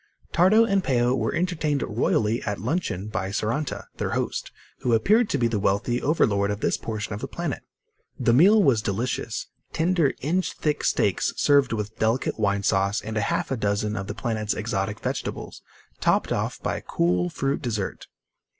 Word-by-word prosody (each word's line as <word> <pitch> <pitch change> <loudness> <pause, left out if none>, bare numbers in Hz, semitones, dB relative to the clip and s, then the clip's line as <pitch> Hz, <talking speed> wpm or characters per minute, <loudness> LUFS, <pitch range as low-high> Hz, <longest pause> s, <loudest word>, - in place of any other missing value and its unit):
Tardo 195 +7 +5
and 195 -4 +1
Peo 125 -4 +2
were 130 - 0
entertained 160 -5 0
royally 110 0 +1
at 105 -2 -3
luncheon 115 - -2
by 100 -3 -3
Saranta, 115 +8 -2
their - - -2
host, - - -3 0.3
who 120 -2 +2
appeared 215 - +3
to - - +1
be 120 - +2
the 110 -3 -1
wealthy 100 +6 0
overlord 100 -10 +2
of 105 0 -2
this - - +1
portion 110 -2 -4
of 100 - -5
the - - -3
planet. - - -4 0.6
The 115 - +3
meal 200 - +6
was 125 -7 +3
delicious 115 +2 -2 0.3
tender, 165 -3 +2
inch 175 +7 0
thick 150 -1 -1
steaks 100 -4 +1
served 145 -2 +4
with 105 -1 -4
delicate 115 +2 0
wine 100 -1 +1
sauce 100 +2 +2
and 110 - -6
half 110 +4 -1
a - - +1
dozen 105 0 0
of 95 -1 -4
the 105 - -5
planet's 110 -2 -2
exotic 105 -1 -2
vegetables, - - -4 0.4
topped - - +2
off - - -1
by - - -1
a - - -7
cool 90 +1 0
fruit 135 - -2
dessert. 110 -7 -3
115 Hz, 175 wpm, -25 LUFS, 105-145 Hz, 0.6 s, meal